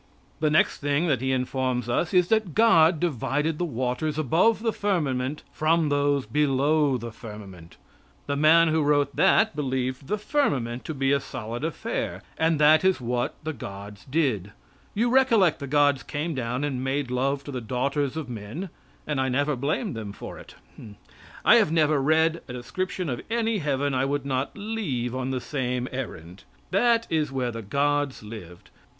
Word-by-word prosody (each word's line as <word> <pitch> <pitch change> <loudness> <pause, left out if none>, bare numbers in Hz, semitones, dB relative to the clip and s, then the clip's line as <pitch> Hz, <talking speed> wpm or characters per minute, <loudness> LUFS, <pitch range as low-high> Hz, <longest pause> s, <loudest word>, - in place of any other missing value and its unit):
The 155 -1 +2
next 155 - +2
thing 145 +3 +1
that 130 -5 +1
he 130 0 0
informs 130 -1 -1
us 140 +7 0
is 180 -2 +3
that 220 -7 +1
God 170 -8 +5
divided 150 0 -1
the 175 - 0
waters 130 +2 -2
above 170 - +2
the 225 -2 +1
firmament 150 -8 -1
from 155 0 +2
those 145 -1 +1
below 145 +2 +2
the 115 0 -7
firmament. 100 -7 -11 0.5
The 140 - -2
man 160 +3 +5
who 160 0 +2
wrote 145 -1 +2
that 210 +3 +4
believed 130 -2 -2
the 210 - 0
firmament 140 - -1
to 155 - -4
be 135 0 +1
a 140 - +3
solid 120 -2 -6
affair. 160 0 -3
And 160 -1 +1
that 155 +2 +6
is 190 -3 +3
what 120 0 -2
the 160 +1 -3
gods 100 -3 -9
did. 130 - 0 0.4
You 235 +3 +1
recollect 230 - +4
the 140 - -5
gods 145 -1 +3
came 155 +3 -3
down 125 0 -2
and 130 -3 -2
made 135 -1 -1
love 135 +2 0
to 145 - -7
the 130 -2 -4
daughters 135 +5 -1
of 155 -4 -4
men 120 - -6 0.4
and 150 -3 -1
I 130 - 0
never 145 +3 +1
blamed 150 - -2
them 105 -3 -6
for - - -9
it. - - -14 0.9
I - - +8
have - - +3
never 155 -3 +3
read 160 +3 +2
a 125 - -7
description 180 +9 -4
of 125 -4 -3
any 225 -2 0
heaven 145 -2 -1
I 130 0 +1
would 145 0 -2
not 135 +6 -2
leave 200 - -3
on 130 0 -3
the 130 -1 -1
same 125 -1 -2
errand. 90 -9 -7 0.3
That 230 +4 +3
is 155 -3 0
where 130 -2 -1
the 115 0 -6
gods 140 +4 0
lived. 105 -6 -11
140 Hz, 175 wpm, -25 LUFS, 125-160 Hz, 0.9 s, I